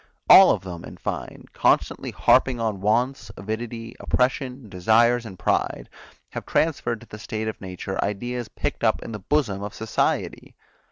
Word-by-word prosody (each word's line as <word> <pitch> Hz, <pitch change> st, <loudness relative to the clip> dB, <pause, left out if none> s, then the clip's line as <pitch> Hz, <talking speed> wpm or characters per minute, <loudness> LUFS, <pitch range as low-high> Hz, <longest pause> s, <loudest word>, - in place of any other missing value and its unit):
All 190 Hz, -, +10 dB
of 95 Hz, -, +1 dB
them, 90 Hz, -3 st, -7 dB
in -, -, -10 dB
fine, -, -, -5 dB
constantly -, -, +1 dB
harping 125 Hz, -3 st, +3 dB
on 110 Hz, -4 st, -2 dB
wants, 115 Hz, +3 st, 0 dB
avidity, 115 Hz, +3 st, -5 dB
oppression, 125 Hz, -1 st, -1 dB
desires 115 Hz, +5 st, +3 dB
and 95 Hz, -3 st, -10 dB
pride, -, -, -1 dB, 0.4 s
have -, -, -5 dB
transferred 120 Hz, -8 st, 0 dB
to 120 Hz, -, -14 dB
the 105 Hz, -, -10 dB
state 110 Hz, +1 st, -4 dB
of 110 Hz, -, -5 dB
nature 95 Hz, 0 st, -4 dB
ideas 120 Hz, +4 st, -3 dB
picked 145 Hz, +4 st, -4 dB
up 110 Hz, -1 st, +2 dB
in -, -, -7 dB
the 105 Hz, -, -5 dB
bosom 105 Hz, -3 st, 0 dB
of 105 Hz, 0 st, -6 dB
society. 110 Hz, -1 st, -2 dB
110 Hz, 160 wpm, -24 LUFS, 100-120 Hz, 0.4 s, All